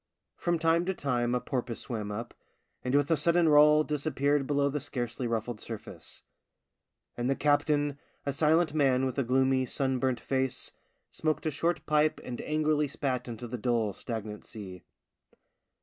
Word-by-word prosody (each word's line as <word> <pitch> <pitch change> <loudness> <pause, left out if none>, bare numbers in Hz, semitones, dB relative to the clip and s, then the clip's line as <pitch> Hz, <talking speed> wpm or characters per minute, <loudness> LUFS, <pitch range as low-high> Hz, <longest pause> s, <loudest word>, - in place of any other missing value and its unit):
From 175 -1 0
time 165 +1 +3
to 190 0 -1
time 125 -4 0
a - - +1
porpoise 120 -1 -3
swam 110 -4 -4
up, 115 +3 -5 0.5
and 125 +2 0
with 145 +2 +2
a - - +6
sudden 170 +3 +3
roll 150 0 +6
disappeared 145 -2 0
below 140 -1 +2
the 145 +1 -1
scarcely 125 -3 -3
ruffled 115 0 -2
surface. 115 -2 -8 0.9
And 120 +1 -1
the 135 - +2
captain, 145 0 +1 0.3
a 140 - -1
silent 155 +2 +3
man 135 -4 +3
with 130 +1 -2
a - - +2
gloomy, 130 +1 +2
sunburnt 130 -1 0
face, 130 -1 -1 0.4
smoked 155 0 -1
a 155 - +1
short 155 +1 -1
pipe 150 0 +2
and 125 -1 -5
angrily 150 -1 +1
spat 130 -2 -2
into 120 0 -6
the 120 +1 -5
dull, 115 -3 0
stagnant 110 -2 -6
sea. 95 -5 -9
135 Hz, 160 wpm, -29 LUFS, 120-150 Hz, 0.9 s, a